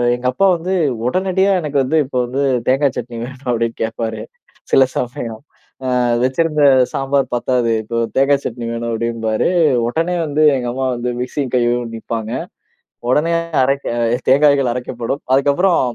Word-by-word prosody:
எங்க 125 Hz, +1 st, -9 dB
அப்பா 195 Hz, +9 st, +1 dB
வந்து, 180 Hz, +3 st, -3 dB, 0.3 s
"உடனடியா 190 Hz, +6 st, +1 dB
எனக்கு 145 Hz, -2 st, -2 dB
வந்து 160 Hz, +5 st, 0 dB
இப்போ 130 Hz, -1 st, -5 dB
வந்து 130 Hz, +3 st, -3 dB, 0.3 s
தேங்காய் 135 Hz, +1 st, +2 dB
சட்னி 120 Hz, -1 st, -5 dB
வேணும்." 130 Hz, 0 st, -8 dB
அப்படின்னு 115 Hz, -1 st, -1 dB
கேட்பாரு 115 Hz, 0 st, -3 dB, 0.5 s
சில 135 Hz, -, +6 dB
சமயம்." 120 Hz, -2 st, -4 dB, 0.6 s
அ -, -, +1 dB, 0.2 s
வச்சிருந்த 150 Hz, +3 st, +1 dB, 0.3 s
சாம்பார் 135 Hz, -1 st, 0 dB
பத்தாது, 120 Hz, -1 st, 0 dB
இப்போ 115 Hz, +2 st, -4 dB, 0.2 s
தேங்கா 140 Hz, +1 st, +4 dB
சட்னி 120 Hz, 0 st, -4 dB
வேணும்." 115 Hz, 0 st, -3 dB
அப்டிம்பாரு. 115 Hz, -1 st, -1 dB, 0.4 s
உடனே 165 Hz, +7 st, -1 dB
வந்து 150 Hz, 0 st, 0 dB
எங்க 125 Hz, -1 st, -3 dB
அம்மா 130 Hz, +1 st, -2 dB
வந்து 120 Hz, +1 st, -3 dB
மிக்ஸியும் 130 Hz, 0 st, -3 dB
கையும் 120 Hz, -1 st, +1 dB
நிப்பாங்க. 115 Hz, 0 st, -5 dB, 0.8 s
உடனே 155 Hz, +5 st, +2 dB, 0.3 s
அரைக்க 135 Hz, +2 st, 0 dB, 0.4 s
தேங்காய்கள் 140 Hz, -2 st, +4 dB
அரைக்கப்படும். 125 Hz, +1 st, -4 dB
அதுக்கப்புறம் 145 Hz, +7 st, +3 dB
130 Hz, 140 wpm, -18 LUFS, 120-145 Hz, 0.8 s, சில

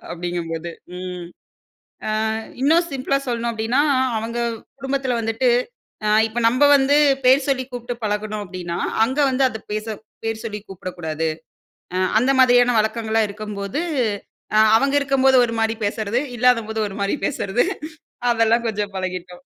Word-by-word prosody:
அப்படிங்கும்போது 170 Hz, -1 st, -4 dB, 0.3 s
ம். 180 Hz, -1 st, -6 dB, 1.0 s
அ -, -, 0 dB, 0.3 s
இன்னும் 325 Hz, +5 st, +4 dB
சிம்ப்ளா 275 Hz, 0 st, 0 dB
சொல்லணும் 235 Hz, -1 st, -1 dB
அப்டின்னா, 225 Hz, +5 st, +1 dB, 0.4 s
அவங்க 230 Hz, +2 st, -4 dB, 0.4 s
குடும்பத்ல 270 Hz, -1 st, -1 dB
வந்துட்டு 225 Hz, +3 st, +1 dB, 0.6 s
அ -, -, +2 dB, 0.2 s
இப்போ 225 Hz, +2 st, -4 dB
நம்ப 250 Hz, +5 st, +3 dB
வந்து 275 Hz, +1 st, +3 dB, 0.3 s
பேர் 260 Hz, +2 st, +5 dB
சொல்லி 265 Hz, -1 st, +1 dB
கூப்ட்டு 245 Hz, 0 st, -5 dB
பழகுனோம் 210 Hz, 0 st, -2 dB
அப்டின்னா, 175 Hz, -2 st, -5 dB, 0.3 s
அங்க 265 Hz, +5 st, -3 dB
வந்து 260 Hz, +1 st, +1 dB
அத 220 Hz, -2 st, -7 dB
பேச 215 Hz, 0 st, -3 dB, 0.4 s
பேர் 225 Hz, 0 st, -3 dB
சொல்லி 210 Hz, -2 st, -4 dB
கூப்டக்கூடாது. 165 Hz, -4 st, -4 dB, 0.9 s
அந்த 250 Hz, +4 st, +2 dB
மாதிரியான 245 Hz, -1 st, +5 dB
வழக்கங்களா 220 Hz, 0 st, 0 dB
இருக்கும்போது, 200 Hz, +3 st, -5 dB, 0.8 s
அ -, -, +6 dB, 0.2 s
அவங்க 275 Hz, +3 st, 0 dB
இருக்கும்போது 270 Hz, -1 st, +3 dB
ஒரு 230 Hz, -, -4 dB
மாரி 225 Hz, 0 st, +1 dB
பேசறது, 220 Hz, +4 st, -1 dB, 0.2 s
இல்லாதபோது 230 Hz, -3 st, +2 dB
ஒரு 195 Hz, -, -9 dB
மாரி 200 Hz, +8 st, 0 dB
பேசறது, 220 Hz, -3 st, 0 dB, 0.7 s
அதெல்லாம் 230 Hz, +1 st, +2 dB
கொஞ்சம் 210 Hz, -2 st, -3 dB
பழகிட்டோம். 180 Hz, -1 st, -5 dB
225 Hz, 130 wpm, -21 LUFS, 200-250 Hz, 1.0 s, அ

